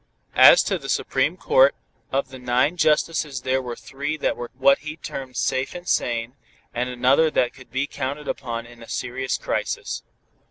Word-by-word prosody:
As -, -, +8 dB
to -, -, -1 dB
the -, -, -8 dB
Supreme -, -, 0 dB
Court, -, -, +4 dB, 0.4 s
of 135 Hz, +1 st, 0 dB
the 130 Hz, -, -10 dB
nine 125 Hz, +6 st, +1 dB
justices 150 Hz, -4 st, +1 dB
there 130 Hz, +1 st, 0 dB
were 120 Hz, -2 st, -5 dB
three 145 Hz, +5 st, -4 dB
that -, -, 0 dB
were 120 Hz, -, -6 dB
what 140 Hz, +1 st, +5 dB
he 150 Hz, +1 st, -7 dB
termed 130 Hz, -5 st, -7 dB
"safe 130 Hz, +5 st, -1 dB
and 175 Hz, 0 st, -8 dB
sane," 120 Hz, 0 st, 0 dB, 0.4 s
and 125 Hz, +1 st, -1 dB
another 130 Hz, +6 st, +3 dB
that 125 Hz, -5 st, +1 dB
could 130 Hz, -3 st, -15 dB
be 130 Hz, +4 st, -1 dB
counted 145 Hz, +1 st, -5 dB
upon 115 Hz, -3 st, -4 dB
in 120 Hz, 0 st, -15 dB
a 115 Hz, -, -12 dB
serious 130 Hz, +1 st, -2 dB
crisis. -, -, -3 dB
130 Hz, 175 wpm, -23 LUFS, 125-150 Hz, 0.4 s, As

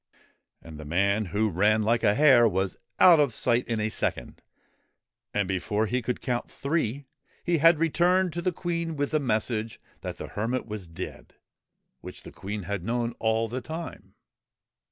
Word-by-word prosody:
And 80 Hz, -2 st, -10 dB
the -, -, -7 dB
man 100 Hz, +7 st, +1 dB
who 105 Hz, +4 st, 0 dB
ran 105 Hz, +5 st, +3 dB
like 115 Hz, +2 st, +2 dB
a 100 Hz, -, +4 dB
hare 130 Hz, -5 st, +6 dB
was 95 Hz, -2 st, -1 dB, 0.2 s
out 175 Hz, -4 st, +8 dB
of 145 Hz, -, +2 dB
sight 120 Hz, 0 st, +1 dB
in 115 Hz, -2 st, -1 dB
a 105 Hz, 0 st, 0 dB
second, -, -, -3 dB, 0.9 s
and 100 Hz, -2 st, 0 dB
before 105 Hz, +3 st, -1 dB
they 125 Hz, +4 st, -1 dB
could 125 Hz, +1 st, -3 dB
count 120 Hz, -2 st, -2 dB
three 140 Hz, -3 st, -2 dB, 0.4 s
he 175 Hz, -2 st, +1 dB
had 165 Hz, +2 st, +6 dB
returned 175 Hz, +3 st, +2 dB
to 175 Hz, -, -3 dB
the 185 Hz, -, 0 dB
Queen 170 Hz, -2 st, -3 dB
with 145 Hz, -1 st, -2 dB
the 155 Hz, -, +2 dB
message 110 Hz, -3 st, -1 dB, 0.2 s
that -, -, -6 dB
the -, -, -7 dB
hermit 115 Hz, +5 st, -2 dB
was 105 Hz, -4 st, -7 dB
dead, 80 Hz, +3 st, -8 dB, 0.6 s
which -, -, -10 dB
the -, -, -10 dB
Queen 105 Hz, +1 st, -6 dB
had 95 Hz, 0 st, -4 dB
known 120 Hz, +2 st, -1 dB
all 110 Hz, 0 st, +1 dB
the 125 Hz, +4 st, -4 dB
time. 160 Hz, +6 st, -8 dB
115 Hz, 175 wpm, -27 LUFS, 105-150 Hz, 0.9 s, out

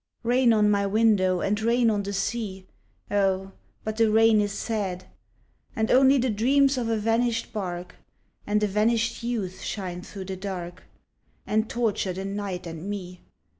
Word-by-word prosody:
Rain 245 Hz, +1 st, +3 dB
on 210 Hz, -2 st, +4 dB
my 200 Hz, -1 st, +2 dB
window 195 Hz, -4 st, +3 dB
and 210 Hz, +2 st, 0 dB
rain 235 Hz, +1 st, +3 dB
on 205 Hz, -1 st, 0 dB
the 200 Hz, 0 st, -4 dB
sea 195 Hz, -1 st, -3 dB, 0.5 s
(Oh, 195 Hz, -1 st, +1 dB, 0.3 s
but 215 Hz, 0 st, -4 dB
the 225 Hz, -1 st, +4 dB
rain 220 Hz, 0 st, +5 dB
is 205 Hz, -1 st, -1 dB
sad), 195 Hz, -4 st, -3 dB, 0.7 s
And 220 Hz, 0 st, 0 dB
only 265 Hz, +2 st, +6 dB
the 250 Hz, -1 st, +1 dB
dreams 275 Hz, +6 st, +3 dB
of 240 Hz, -3 st, -2 dB
a 225 Hz, -, +1 dB
vanished 230 Hz, +2 st, 0 dB
barque 180 Hz, -4 st, -4 dB, 0.5 s
And 210 Hz, +1 st, +1 dB
a -, -, +3 dB
vanished 225 Hz, +3 st, +1 dB
youth 205 Hz, -6 st, -3 dB
shine 180 Hz, -3 st, -4 dB
through 190 Hz, +1 st, -8 dB
the 190 Hz, 0 st, -5 dB
dark, 180 Hz, -3 st, -6 dB, 0.6 s
And 215 Hz, +2 st, 0 dB
torture 220 Hz, -5 st, -1 dB
the 190 Hz, +2 st, -5 dB
night 195 Hz, -2 st, -4 dB
and 165 Hz, +3 st, -6 dB
me. 180 Hz, -3 st, -6 dB
210 Hz, 165 wpm, -26 LUFS, 190-230 Hz, 0.7 s, only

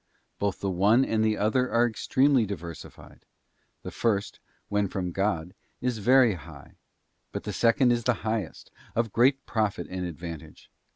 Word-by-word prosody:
Both 100 Hz, -2 st, -2 dB
the 100 Hz, -, -1 dB
one 105 Hz, +8 st, +4 dB
and 110 Hz, -1 st, 0 dB
the 110 Hz, -1 st, +1 dB
other 125 Hz, +5 st, +1 dB
are 120 Hz, +1 st, +4 dB
extremely 130 Hz, +3 st, +2 dB
diversified. 85 Hz, -4 st, -9 dB, 0.6 s
The -, -, -6 dB
first, 100 Hz, -4 st, -1 dB, 0.3 s
when 105 Hz, 0 st, 0 dB
from 90 Hz, -2 st, -3 dB
God, 90 Hz, -2 st, -1 dB, 0.3 s
is 125 Hz, -3 st, -2 dB
very 125 Hz, +1 st, +5 dB
high; 80 Hz, -4 st, -12 dB, 0.5 s
but -, -, -5 dB
the -, -, -4 dB
second 120 Hz, +2 st, +3 dB
is 120 Hz, -1 st, 0 dB
the 125 Hz, 0 st, +2 dB
highest, 110 Hz, -5 st, -3 dB, 0.2 s
of 115 Hz, -2 st, 0 dB
great 135 Hz, +3 st, +3 dB
profit 105 Hz, -6 st, -1 dB
and 90 Hz, 0 st, -3 dB
advantage. 85 Hz, -2 st, -8 dB
105 Hz, 155 wpm, -27 LUFS, 90-120 Hz, 0.6 s, very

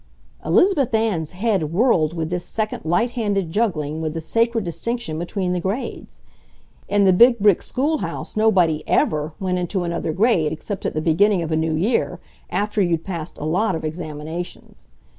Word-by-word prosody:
Elizabeth 300 Hz, -, +3 dB
Ann's 205 Hz, -9 st, 0 dB
head 185 Hz, -5 st, -1 dB
whirled 170 Hz, -6 st, +2 dB
with 160 Hz, 0 st, -3 dB
this 180 Hz, 0 st, -2 dB
second 215 Hz, -1 st, -3 dB
light 225 Hz, +9 st, +1 dB
handed 205 Hz, -8 st, -1 dB
juggling 160 Hz, -8 st, -1 dB
with 160 Hz, 0 st, -3 dB
the -, -, -2 dB
sacred 230 Hz, +7 st, 0 dB
distinction 175 Hz, -1 st, -3 dB
between 180 Hz, +1 st, -2 dB
the 180 Hz, -, 0 dB
grades. 195 Hz, +9 st, -5 dB, 0.7 s
In 205 Hz, 0 st, +3 dB
the 190 Hz, -, +5 dB
big 235 Hz, +6 st, +6 dB
brick 205 Hz, -4 st, +4 dB
schoolhouse 295 Hz, +4 st, -2 dB
nobody 185 Hz, -8 st, +3 dB
EVER 155 Hz, 0 st, +1 dB
went 185 Hz, -1 st, -1 dB
into 180 Hz, +1 st, -2 dB
another 170 Hz, -2 st, -2 dB
grade 185 Hz, -5 st, +2 dB
except 180 Hz, +5 st, -4 dB
at -, -, -4 dB
the 155 Hz, -, 0 dB
beginning 175 Hz, +4 st, +3 dB
of 160 Hz, -, -4 dB
a -, -, +2 dB
new 160 Hz, 0 st, 0 dB
year, 205 Hz, +10 st, 0 dB, 0.3 s
after 210 Hz, 0 st, 0 dB
you'd 170 Hz, -3 st, +1 dB
passed 170 Hz, -4 st, -5 dB
a 150 Hz, -, -5 dB
lot 185 Hz, +7 st, +1 dB
of 160 Hz, -, -4 dB
examinations. 155 Hz, -, -7 dB
180 Hz, 170 wpm, -21 LUFS, 160-215 Hz, 0.7 s, big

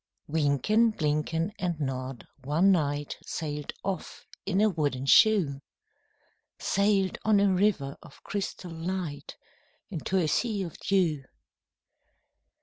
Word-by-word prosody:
Wynken, 160 Hz, -, +2 dB
Blynken, 155 Hz, +4 st, 0 dB
and 175 Hz, -4 st, -2 dB
Nod 130 Hz, -3 st, -4 dB, 0.2 s
one 160 Hz, +8 st, +3 dB
night 145 Hz, -4 st, 0 dB
Sailed 150 Hz, -2 st, -4 dB
off 190 Hz, -1 st, -4 dB, 0.2 s
in 195 Hz, -1 st, +1 dB
a 215 Hz, -, +5 dB
wooden 145 Hz, -8 st, -1 dB
shoe,— 155 Hz, -5 st, +5 dB, 1.0 s
Sailed 200 Hz, -2 st, +1 dB
on 215 Hz, -2 st, +4 dB
a 200 Hz, -1 st, +3 dB
river 180 Hz, -8 st, +1 dB
of 155 Hz, -5 st, -16 dB
crystal 195 Hz, -3 st, -4 dB
light 165 Hz, -3 st, -5 dB, 0.5 s
Into 185 Hz, +2 st, -2 dB
a 175 Hz, -4 st, +2 dB
sea 210 Hz, +3 st, 0 dB
of 170 Hz, -, -7 dB
dew. 170 Hz, -8 st, +1 dB
165 Hz, 115 wpm, -28 LUFS, 145-195 Hz, 1.0 s, a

